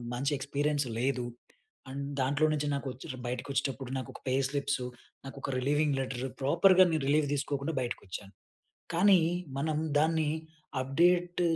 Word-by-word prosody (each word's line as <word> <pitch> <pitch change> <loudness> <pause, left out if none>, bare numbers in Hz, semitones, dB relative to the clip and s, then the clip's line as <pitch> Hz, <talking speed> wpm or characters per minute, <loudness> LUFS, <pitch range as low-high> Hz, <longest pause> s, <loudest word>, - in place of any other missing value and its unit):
మంచి 140 +4 0
ఎక్స్పీరియన్స్ 145 +1 0
లేదు. 125 0 0 0.6
అండ్ 140 +1 -4 0.2
దాంట్లో 140 +4 +2
నుంచి 150 -1 -1
నాకొచ్చిర్ 135 -2 -5
బయటకి 125 +3 -4
వచ్చేటప్పుడు 135 -1 -2
నాకోక 130 - -6
పే - - +1 0.2
స్లిప్సు, 140 -2 -1 0.4
నాకోక 135 0 -6
రిలీవింగ్ 145 +2 +2
లెటర్, 130 -1 -3 0.2
ప్రోపర్‌గా 180 +7 +6
నేను 155 -3 0
రిలీవ్ 150 +1 +3
తీసుకోకుండా 140 +2 -1
బయటికొచ్చాను. 100 -4 -5 0.6
కానీ 190 +1 +6 0.4
మనం 155 +2 0 0.2
దాన్ని 160 0 +2 0.5
అప్డేట్ 175 +6 +2
140 Hz, 125 wpm, -30 LUFS, 130-155 Hz, 0.6 s, ప్రోపర్‌గా